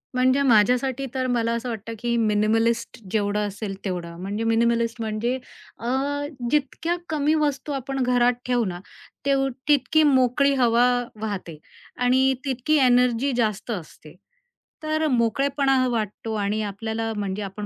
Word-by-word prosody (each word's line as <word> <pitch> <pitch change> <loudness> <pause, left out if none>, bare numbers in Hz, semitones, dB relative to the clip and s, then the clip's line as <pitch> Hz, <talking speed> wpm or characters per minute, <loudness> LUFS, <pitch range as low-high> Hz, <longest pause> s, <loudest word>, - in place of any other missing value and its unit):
म्हणजे 255 +2 +3
माझ्यासाठी 250 +3 +3
तर 260 -1 -1
मला 230 -2 0
असं 235 +2 -3
वाटतं, 230 0 -5
की 235 +1 -1
मिनिमलिस्ट 225 +1 +1
जेवढं 210 0 0
असेल 200 0 -5
तेवढं. 175 -3 -4
म्हणजे 205 +4 -3
मिनिमलिस्ट 230 0 +1
म्हणजे 220 +3 -1 0.4
अ, 235 - -5 0.6
जितक्या 300 +4 0
कमी 300 -1 +1
वस्तू 295 -2 -1
आपण 270 0 -2
घरात 245 0 +3
ठेवू 245 -2 +1
ना, 175 -2 -4 0.5
ते 280 - +3 0.3
तितकी 300 +2 +3
मोकळी 275 0 +3
हवा 245 -1 +4 0.3
वाहते 195 -7 -5 0.4
आणि 260 +2 +3
तितकी 265 +3 0
एनर्जी 250 +1 +3
जास्त 215 0 -1
असते, 160 -5 -8 0.7
तर 310 0 0
मोकळेपणा 270 +1 +2
वाटतो 220 -1 -3
आणि 210 +1 -1
आपल्याला 220 +2 -4
म्हणजे 200 0 -3
आपण 200 +1 -6
235 Hz, 135 wpm, -24 LUFS, 215-265 Hz, 0.7 s, हवा